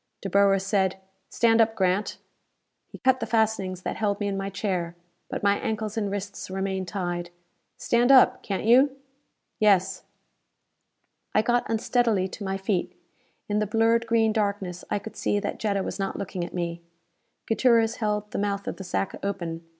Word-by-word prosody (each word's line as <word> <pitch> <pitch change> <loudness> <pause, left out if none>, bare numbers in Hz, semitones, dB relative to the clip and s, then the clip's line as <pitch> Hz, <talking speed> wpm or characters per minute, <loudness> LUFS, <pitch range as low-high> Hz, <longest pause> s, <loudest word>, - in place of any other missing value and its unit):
Dr. 195 - -4
Boer 200 0 +5
said, 190 -1 0 0.3
"Stand 230 -1 +3
up, 225 0 +2
Grant." 190 +1 0 0.7
He - - -11
cut 260 0 +2
the - - -3
fastenings 210 -5 0
that - - -3
held 205 -2 0
me 205 - -1
in 200 - -2
my 195 0 -3
chair. 180 -4 -2 0.3
But - - -4
my 200 0 +3
ankles 215 -1 -3
and 210 -3 -1
wrists 200 -1 -5
remained 190 0 -2
tied. 175 -1 -3 0.5
"Stand 240 +2 +2
up, 265 -2 +6
can't 195 -2 -3
you?" 260 +5 +5 0.6
"Yes." 195 -3 +3 1.3
I 215 - +4
got 240 +1 +1
unsteadily 225 -3 +1
to 205 - -8
my 195 0 -2
feet. 195 -1 -2 0.5
In 210 0 0
the 210 - 0
blurred 225 +2 +2
green 225 -1 +3
darkness 200 -4 -2
I - - 0
could 205 +2 -8
see 205 - 0
that 205 - -4
Jetta 200 -3 0
was - - -5
not 195 - -2
looking 185 -2 -4
at 170 - -7
me. 170 -1 -3 0.6
Gutierrez 230 0 +3
held 210 -1 -2
the - - -2
mouth 200 -1 -2
of - - -4
the 195 - -7
sack 190 +1 -2
open. 175 -5 -3
200 Hz, 175 wpm, -26 LUFS, 190-220 Hz, 1.3 s, up